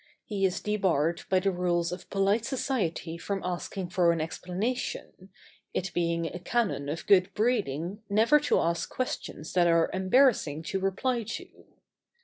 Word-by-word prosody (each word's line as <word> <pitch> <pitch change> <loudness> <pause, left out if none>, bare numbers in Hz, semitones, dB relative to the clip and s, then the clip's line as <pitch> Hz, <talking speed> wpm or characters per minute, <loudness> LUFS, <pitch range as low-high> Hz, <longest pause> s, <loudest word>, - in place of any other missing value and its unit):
He 200 -4 +1
is 180 - -4
debarred 180 -6 +1
by 185 -1 +3
the 195 +1 +2
rules 175 -1 0
of 180 0 -7
polite 200 +3 +2
society 210 - -2
from 200 +2 -2
asking 180 +1 -4
for 175 -1 +3
an 165 - -1
explanation, 185 +4 -4 0.5
it 190 0 -1
being 170 -1 0
a 175 - -5
canon 190 -9 -1
of 160 +3 -4
good 195 -1 +5
breeding 205 - 0
never 225 +9 +5
to 295 - +2
ask 170 0 0
questions 205 -10 -4
that 175 -1 +4
are 165 -1 +3
embarrassing 190 - +3
to 180 +4 -2
reply 215 +6 0
to. 225 +1 -8
185 Hz, 150 wpm, -28 LUFS, 170-210 Hz, 0.5 s, good